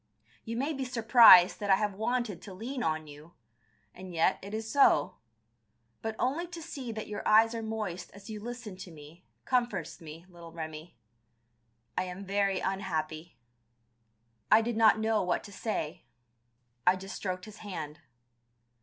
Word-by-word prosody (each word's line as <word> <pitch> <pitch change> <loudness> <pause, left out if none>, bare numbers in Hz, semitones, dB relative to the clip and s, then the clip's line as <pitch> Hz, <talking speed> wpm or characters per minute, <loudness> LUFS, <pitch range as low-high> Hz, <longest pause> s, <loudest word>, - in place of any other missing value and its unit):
You 230 0 -5
may 280 +5 -1
be 270 -2 -3
surprised 230 -7 +7
that 205 - -4
I 190 - +7
have 205 +1 -1
wanted 220 -2 -2
to 195 -3 -10
lean 245 +6 -5
on 155 -5 -1
you. 150 +3 -13 0.6
And 185 0 -10
yet 165 - +2
it 200 - -9
is 220 +1 -4
so. 225 - +3 0.8
But 220 0 -3
only 305 +8 -1
to 345 0 -8
see 285 -7 -6
that 220 -1 -5
your 210 0 -5
eyes 225 +2 +5
are 230 - -3
moist 215 -5 -4
as 200 0 -14
you 215 -1 -6
listen 240 -2 -7
to 185 0 -9
me, 160 +2 -14 0.2
comforts 205 -11 -1
me, 165 +1 -10
little 170 -2 -13
Remi. 160 -1 -8 1.0
I - - 0
am 185 +2 -7
very 195 0 +1
unhappy." 170 -4 -3 1.1
I 220 +1 +7
did 235 0 -2
not 220 -1 +5
know 220 0 +1
what 180 -1 -1
to 205 - -11
say. 175 - -4 0.8
I 180 - +6
just 195 +1 -8
stroked 185 -1 -4
his 215 0 -12
hand. 160 -7 -7
200 Hz, 165 wpm, -30 LUFS, 175-225 Hz, 1.1 s, surprised